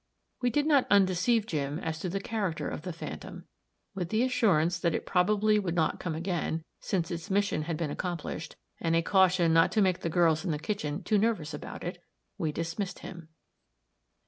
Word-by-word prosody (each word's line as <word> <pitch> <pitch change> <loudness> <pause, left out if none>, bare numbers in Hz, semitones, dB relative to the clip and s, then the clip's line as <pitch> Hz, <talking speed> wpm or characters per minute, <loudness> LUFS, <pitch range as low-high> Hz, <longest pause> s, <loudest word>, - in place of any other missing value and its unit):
We 245 - +2
did 295 +4 +1
not 290 -4 +4
undeceive 200 +3 +3
Jim 145 -6 -2
as 160 -3 -4
to 180 - -3
the 195 +3 -2
character 200 -5 -2
of - - -4
the 180 - -5
phantom. 165 - -8 0.5
With 180 -3 -3
the 220 +4 +2
assurance 180 - +2
that 170 -2 +1
it - - -3
probably 210 +3 +3
would 180 -4 -2
not 160 -2 +1
come 165 -3 -3
again, 165 -1 -2 0.2
since 175 -4 -1
its 170 +3 -5
mission 200 -5 +1
had 160 +1 -3
been 160 -3 -2
accomplished, 170 -2 -4 0.2
and 165 0 +1
a 165 - +3
caution 180 -3 +4
not 165 0 +5
to 215 - +3
make 185 -2 +2
the 165 - -2
girls 165 -1 +3
in 190 - -2
the 155 - 0
kitchen 155 -3 -3
too 210 -2 +2
nervous 205 -8 0
about - - -7
it, - - -5 0.4
we 155 - 0
dismissed 165 +5 -3
him. 170 -4 -9
175 Hz, 195 wpm, -29 LUFS, 165-200 Hz, 0.5 s, not